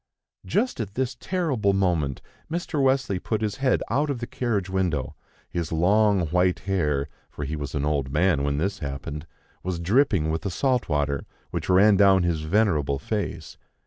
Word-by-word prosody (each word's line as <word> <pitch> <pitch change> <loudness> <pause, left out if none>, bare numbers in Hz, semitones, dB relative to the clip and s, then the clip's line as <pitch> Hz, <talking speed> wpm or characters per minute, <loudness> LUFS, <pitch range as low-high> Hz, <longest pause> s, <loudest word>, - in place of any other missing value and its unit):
Just 235 - 0
at 105 -3 -4
this 130 0 -1
terrible 130 - 0
moment, 85 -9 0 0.3
Mr. 165 -3 -2
Wesley 130 -8 +2
put 110 +3 -2
his 105 -2 -2
head 135 -2 +1
out 145 +5 0
of 140 - -1
the 120 - -4
carriage 115 -7 -2
window; 90 -8 -1 0.3
his 85 -2 -4
long 100 +4 +3
white 90 +2 +2
hair 75 -8 0 0.2
for 75 - -6
he 75 +3 -3
was 75 -1 -5
an 70 0 0
old 70 -3 -1
man 80 0 +2
when 70 0 0
this 95 +6 -1
happened 70 +1 -5 0.3
was 90 -2 -3
dripping 95 - +2
with 80 0 -2
the 100 - -3
salt 125 +6 0
water, 70 -2 -1 0.2
which - - -4
ran 100 +2 +6
down 95 -2 +5
his 85 -3 0
venerable 80 -5 +1
face. 105 +9 -4
95 Hz, 175 wpm, -25 LUFS, 75-110 Hz, 0.3 s, ran